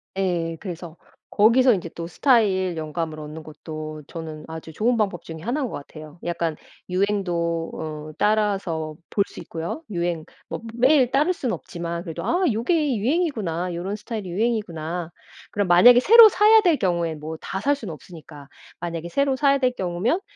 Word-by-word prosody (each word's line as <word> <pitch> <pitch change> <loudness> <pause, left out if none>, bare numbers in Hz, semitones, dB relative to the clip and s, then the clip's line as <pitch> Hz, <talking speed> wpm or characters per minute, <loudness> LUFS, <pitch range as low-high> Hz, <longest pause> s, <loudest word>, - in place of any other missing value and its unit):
예. 175 -4 -1
그래서 175 -4 -7 0.3
거기서 235 +4 +5
인제 175 -3 -3
또 170 +1 -7
스타일 190 - +2
영감을 155 0 -4
얻는 155 +1 -8
것도 155 0 -8
저는 160 -2 -7
아주 160 0 -8
좋은 235 +8 +1
방법 195 -5 -1
중에 160 -1 -8
1 245 - -2
인 260 - -1
것 - - -8
같아요. 155 +2 -10
약간 170 -2 -2 0.3
유행도 175 -4 -1
어 155 -1 -6
따라서 195 -7 0
볼 200 - +2
수 - - -11
있고요. 170 - -5
유행 170 -3 -2 0.3
뭐 - - -5
매일 260 +1 +4
따를 300 +7 +3
수는 255 -8 -2
없지만 170 -1 -5
그래도 170 -1 -6
'아 360 +2 +1
요게 275 +5 +1
유행이구나. 210 - -1
요런 185 +4 -3
스타일이 215 -3 -6
유행이구나.' 175 -6 -2 0.4
그럼 205 -2 0
만약에 240 +8 +8
새로 450 - +9
사야 430 +3 +6
될 345 -6 +3
경우에 170 -3 0
뭐 155 +1 -7
다 190 - -4
살 285 +4 +2
수는 220 - -7
없으니까. 155 -3 -12 0.3
만약에 170 -1 -5
새로 275 +6 +1
사야 280 0 +3
될 255 -2 +2
경우면 190 - -1
180 Hz, 340 characters per minute, -23 LUFS, 165-240 Hz, 0.4 s, 새로